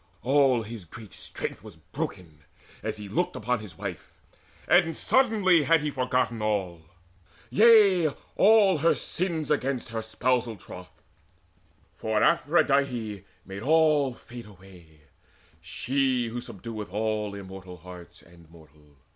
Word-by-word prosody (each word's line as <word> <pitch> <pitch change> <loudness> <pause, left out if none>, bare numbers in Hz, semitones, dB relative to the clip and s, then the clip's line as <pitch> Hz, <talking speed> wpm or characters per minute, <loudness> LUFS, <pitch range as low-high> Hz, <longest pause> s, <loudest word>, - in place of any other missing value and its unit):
All 135 -3 +3
his 110 -1 -8
great 110 +5 -12
strength - - -6
Was - - -12
broken, 80 -5 -7 0.4
as 110 0 -4
he 105 -1 -8
looked 100 - -1
upon 125 +3 -1
his 100 -5 -11
wife. - - -7 0.6
And 165 -3 +3
suddenly 210 -10 +3
had 165 -1 +4
he 150 0 -2
forgotten 125 -3 -1
all 95 -6 -2 0.7
Yea, 205 -6 +6 0.3
all 200 -5 +5
her 165 +3 +3
sins 165 -5 -3
against 135 -4 -1
her 115 0 -3
spousal 115 +1 -1
troth; 90 -1 -13 0.9
For 110 -1 -1
Aphrodite 140 - +1 0.2
made 95 +1 -8
all 150 -2 +3
fade 120 -2 -11
away, 90 -6 -17 0.6
She 130 -3 -1
who 120 +2 -5
subdueth 105 -2 -8
all 105 0 -2
immortal 95 -2 -10
hearts 90 0 -13
And 85 -1 -19
mortal. 75 -3 -20
115 Hz, 125 wpm, -26 LUFS, 95-145 Hz, 0.9 s, Yea